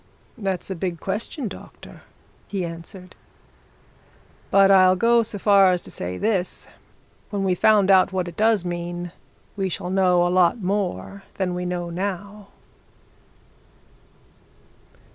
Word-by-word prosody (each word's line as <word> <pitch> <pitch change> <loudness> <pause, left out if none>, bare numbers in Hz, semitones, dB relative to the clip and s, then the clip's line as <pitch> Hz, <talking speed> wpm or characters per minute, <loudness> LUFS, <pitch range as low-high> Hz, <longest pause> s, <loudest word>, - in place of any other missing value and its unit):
"That's 195 -3 -4
a - - -2
big 170 -1 -4
question, 225 - -3
doctor," 195 - -12 0.5
he 195 -3 -3
answered. 175 +3 -10 1.3
"But 195 0 +5
I'll 185 -1 +6
go 235 +4 +3
so 220 -2 -5
far 200 -1 +5
as 180 -1 -1
to - - -11
say 90 +1 -5
this 195 -5 -1 0.6
when 200 -2 -2
we've 185 -2 0
found 205 -3 +4
out 190 0 +5
what 185 -1 -2
it 170 - -8
does 215 -3 +2
mean, 175 0 -5 0.4
we 195 -2 -2
shall 180 0 -4
know 180 -2 +3
a 175 - 0
lot 185 +5 +3
more 140 - -3
than 185 -2 -2
we 180 0 -4
know 175 -1 -4
now!" 200 +3 -5
185 Hz, 135 wpm, -23 LUFS, 175-200 Hz, 1.3 s, I'll